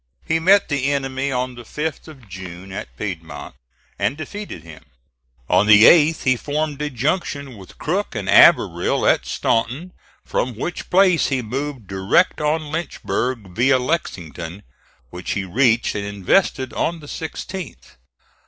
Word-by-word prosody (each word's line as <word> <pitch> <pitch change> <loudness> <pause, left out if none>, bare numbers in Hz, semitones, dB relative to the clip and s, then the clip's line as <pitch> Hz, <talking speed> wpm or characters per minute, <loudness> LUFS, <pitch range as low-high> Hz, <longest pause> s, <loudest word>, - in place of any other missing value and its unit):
He 160 0 +1
met 195 +5 +4
the 140 -1 0
enemy 135 0 -2
on 125 0 -2
the 120 - -10
5th 150 +8 -5
of 135 -8 -14
June 95 0 -9
at 95 - -8
Piedmont, 80 -8 -6 0.5
and 140 - 0
defeated 160 - -7
him. 80 -2 -13 0.6
On 105 - +3
the 105 0 +8
8th 160 +3 +6
he 130 -2 +3
formed 150 +2 -3
a 150 - -1
junction 140 0 -2
with 95 -3 -14
Crook 185 -1 -2
and 100 -3 -4
Averell 100 - +5
at - - +2
Staunton, 125 +11 -1 0.3
from 125 -2 -2
which 165 +10 -5
place 185 -2 +4
he 130 -3 -1
moved 135 +1 -4
direct 95 - +1
on 150 0 -1
Lynchburg, 130 - -3
via 130 +4 +4
Lexington, 95 - -4 0.5
which 90 +1 -4
he 100 -1 -2
reached 115 +4 +2
and 100 - -3
invested 100 - 0
on 170 0 -1
the 150 - -12
16th. 165 - -7
130 Hz, 145 wpm, -21 LUFS, 100-155 Hz, 0.6 s, the